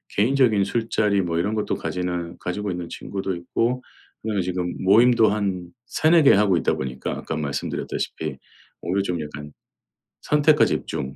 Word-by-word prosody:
개인적인 115 -2 +3
술자리 105 -1 0
뭐 85 -3 -1
이런 100 +5 0
것도 105 - -1
가지는 90 -1 -3
가지고 100 +2 -3
있는 90 -1 -4
친구도 95 0 -4
있고 120 +8 -1 0.4
근데 105 -2 -2
지금 90 0 -2
모임도 115 +3 +6
한 95 -4 -2
3-4 160 0 +4
개 140 - +7
하고 100 -3 +3
있다 85 - +1
보니까 65 0 -4
아까 80 - -5
말씀드렸다시피 75 0 -3 0.4
오히려 95 +4 -1
좀 90 -3 -2
약간 75 0 -8 0.7
선택과 150 0 +4
집중 65 0 -3
95 Hz, 330 characters per minute, -23 LUFS, 85-110 Hz, 0.7 s, 개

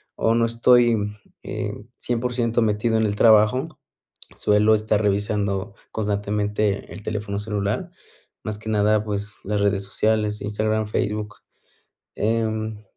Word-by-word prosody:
o 115 +1 +2
no 115 0 +3
estoy, 115 -2 +3 0.3
eh, - - -4 0.2
100 120 -1 -1
metido 110 +1 +1
en 110 - +2
el 100 - -2
trabajo, 115 +8 +4 0.6
suelo 105 +1 +4
estar 105 0 +1
revisando 100 0 -1 0.2
constantemente 105 -1 -1
el 105 - -9
teléfono 105 -1 -3
celular, 105 -1 -2 0.5
más 110 -1 -3
que 110 +1 -10
nada, 105 0 +3
pues 105 -1 -4
las 105 0 -1
redes 100 -1 +1
sociales, 105 +1 0
Instagram, 110 +1 -1
Facebook, 105 -1 -2 0.8
em, 110 -1 -1
105 Hz, 120 wpm, -23 LUFS, 105-110 Hz, 0.8 s, trabajo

